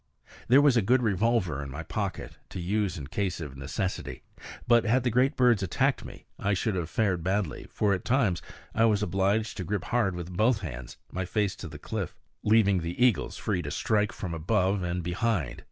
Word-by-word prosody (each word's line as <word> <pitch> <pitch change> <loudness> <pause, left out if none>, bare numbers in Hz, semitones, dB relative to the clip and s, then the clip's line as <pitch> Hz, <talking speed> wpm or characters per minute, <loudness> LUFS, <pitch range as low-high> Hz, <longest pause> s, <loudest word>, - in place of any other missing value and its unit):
There 135 +4 +6
was 140 -4 +5
a 115 - +4
good 125 +5 +3
revolver 100 -7 +1
in 70 - -6
my 70 +5 -6
pocket, 95 +4 -4
to - - -6
use 95 +1 -1
in 70 - -6
case 95 +5 -2
of 75 -5 -7
necessity; 70 +8 -4 0.4
but 120 -1 +5
had 120 +3 +2
the 125 - +1
great 130 +5 +3
birds 120 -5 +4
attacked 95 - +1
me - - -11
I 100 0 +1
should 110 +3 0
have 85 -3 -2
fared 95 -7 0
badly, 95 +2 -1
for 105 -2 +1
at 95 - -2
times 115 -9 +1 0.3
I 115 - +4
was 105 -2 +2
obliged 100 +4 0
to 95 - -3
grip 100 +1 -2
hard 115 -7 0
with 90 0 -6
both 110 +2 +3
hands, 60 -8 -7
my 95 +1 -3
face 100 +1 0
to 95 - -7
the 75 -1 -9
cliff, - - -4 0.3
leaving 105 -3 +4
the 85 +4 -5
eagles 120 -7 +1
free 95 -4 -1
to 70 - -5
strike 105 +6 +1
from 90 -4 -5
above 95 +3 +1
and 90 0 -2
behind. 90 - -1
100 Hz, 200 wpm, -28 LUFS, 85-110 Hz, 0.4 s, There